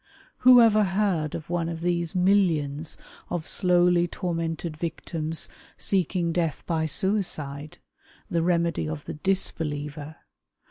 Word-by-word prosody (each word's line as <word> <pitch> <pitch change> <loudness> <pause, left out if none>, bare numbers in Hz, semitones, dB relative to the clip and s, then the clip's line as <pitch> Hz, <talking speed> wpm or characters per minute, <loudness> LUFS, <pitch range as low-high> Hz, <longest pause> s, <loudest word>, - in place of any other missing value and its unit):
Who 250 0 +8
ever 215 -2 +5
heard' 190 -6 0
of 160 - -7
one 170 -1 -1
of 165 -1 -5
these 170 -1 -1
millions 165 -6 +1 0.3
of 170 -3 -3
slowly 175 -1 +3
tormented 165 -2 -3
victims 160 0 -4 0.3
seeking 180 -3 0
death 165 -4 -1
by 160 -2 0
suicide 155 -5 0 0.3
— - - -29
the 170 - 0
remedy 170 -2 0
of 155 -2 -6
the - - -5
disbeliever? 150 -4 -3
170 Hz, 125 wpm, -26 LUFS, 155-180 Hz, 0.3 s, Who